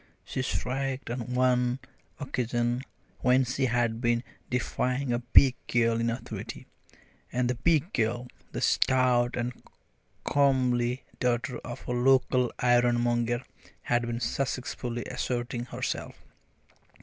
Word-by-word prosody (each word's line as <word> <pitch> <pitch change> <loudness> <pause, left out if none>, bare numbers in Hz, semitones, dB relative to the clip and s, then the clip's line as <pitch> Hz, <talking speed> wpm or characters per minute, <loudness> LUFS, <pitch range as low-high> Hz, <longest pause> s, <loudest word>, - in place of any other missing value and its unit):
she 130 - -3
shrieked 130 0 -2
on 125 0 -4
one 125 -1 +2 0.4
occasion 120 -3 -1 0.4
when 130 +1 +4
she 130 +2 0
had 120 -1 0
been 120 -1 +2 0.3
defying 125 +1 0
a 120 - +1
big 125 +2 +6
girl 115 -1 +2
in 115 - +1
authority, 115 +2 -6 0.7
and 125 0 +1
the 125 - +1
big 160 - +1
girl 120 +2 0 0.2
the - - -4
stout 125 -2 +3
and 120 0 -2 0.7
comely 130 -3 +2 0.2
daughter 125 +1 0
of 120 0 -8
a - - -2
local 125 0 +3
ironmonger 120 0 +2 0.4
had 120 0 +2
been 120 0 -2
successfully 125 -1 -2
asserting 120 -1 -3
herself. - - -4
125 Hz, 115 wpm, -28 LUFS, 120-130 Hz, 0.7 s, big